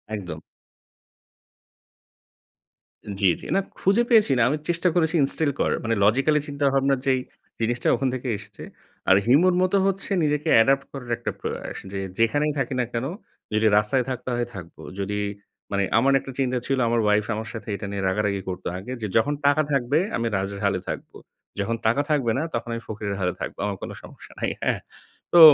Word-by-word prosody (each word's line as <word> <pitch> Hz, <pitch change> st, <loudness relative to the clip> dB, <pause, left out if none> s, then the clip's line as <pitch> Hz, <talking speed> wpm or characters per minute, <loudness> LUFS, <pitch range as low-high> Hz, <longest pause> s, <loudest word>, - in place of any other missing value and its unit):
একদম। 90 Hz, -6 st, -6 dB, 2.8 s
জ্বী, 95 Hz, -3 st, +5 dB
জ্বী। -, -, -9 dB
না, -, -, +4 dB, 0.2 s
খুঁজে 200 Hz, +5 st, +3 dB
পেয়েছি 220 Hz, -, +5 dB
না। -, -, +3 dB
আমি 150 Hz, -, 0 dB
চেষ্টা 175 Hz, +1 st, +1 dB
করেছি 165 Hz, 0 st, +2 dB
ইনস্টিল 145 Hz, +1 st, +2 dB
করার। -, -, +1 dB
মানে 115 Hz, 0 st, +1 dB
লজিক্যালি 135 Hz, +8 st, +4 dB
চিন্তাভাবনার 140 Hz, -1 st, +1 dB
যেই 130 Hz, -1 st, +3 dB, 0.4 s
জিনিসটা 120 Hz, +2 st, 0 dB
ওখান 135 Hz, -, -1 dB
থেকে 130 Hz, 0 st, -4 dB
এসেছে। 105 Hz, 0 st, -11 dB, 0.5 s
আর 95 Hz, -, +8 dB
হিউমার 175 Hz, +9 st, +5 dB
মত 185 Hz, +1 st, +1 dB
হচ্ছে 195 Hz, +1 st, -2 dB
নিজেকে 150 Hz, 0 st, 0 dB
অ্যাডপ্ট 135 Hz, +4 st, +4 dB
করার 125 Hz, -3 st, -7 dB
একটা -, -, -3 dB
প্রয়াস। -, -, -5 dB
যে, 100 Hz, -, -3 dB, 0.2 s
যেখানেই 145 Hz, +6 st, +2 dB
থাকি 135 Hz, 0 st, -1 dB
না 125 Hz, -, +2 dB
কেন? 115 Hz, +3 st, -1 dB, 0.5 s
যদি 110 Hz, +1 st, +3 dB
রাস্তায় 115 Hz, +5 st, +2 dB
থাকতে 125 Hz, 0 st, -4 dB
হয়, 120 Hz, 0 st, 0 dB
থাকব। 85 Hz, -2 st, -9 dB, 0.2 s
যদি 105 Hz, +1 st, -2 dB, 0.5 s
মানে 100 Hz, 0 st, +1 dB
আমার 135 Hz, +4 st, +4 dB
একটা 135 Hz, -, -8 dB
চিন্তা 130 Hz, -1 st, +1 dB
ছিল, 135 Hz, -1 st, +1 dB
আমার 115 Hz, 0 st, +2 dB
ওয়াইফ 105 Hz, 0 st, +3 dB
আমার 110 Hz, +1 st, -5 dB
সাথে 115 Hz, +1 st, -8 dB
এটা 100 Hz, -, -6 dB
নিয়ে 100 Hz, -1 st, -3 dB
রাগারাগি 100 Hz, 0 st, 0 dB
করত 90 Hz, 0 st, -5 dB
আগে 120 Hz, +7 st, -7 dB
যে, 105 Hz, -, -1 dB
যখন 145 Hz, +6 st, +2 dB
টাকা 145 Hz, +2 st, +5 dB
থাকবে 140 Hz, +3 st, +2 dB, 0.2 s
আমি 115 Hz, -, -1 dB
রাজের 100 Hz, +1 st, -3 dB
হালে 95 Hz, -2 st, +1 dB
থাকব। -, -, -5 dB, 0.5 s
যখন 115 Hz, +4 st, 0 dB
টাকা 120 Hz, +6 st, +3 dB
থাকবে 135 Hz, -7 st, +2 dB
না, 150 Hz, -, 0 dB
তখন 115 Hz, 0 st, -3 dB
আমি 115 Hz, -, -4 dB
ফকিরের 105 Hz, -2 st, -4 dB
হালে 90 Hz, -1 st, +1 dB
থাকব। -, -, -4 dB
আমার 100 Hz, -2 st, -2 dB
কোনও -, -, -5 dB
সমস্যা -, -, -13 dB
নাই। -, -, 0 dB
হ্যাঁ? -, -, +1 dB, 0.6 s
তো -, -, +9 dB
120 Hz, 180 wpm, -24 LUFS, 105-140 Hz, 2.8 s, তো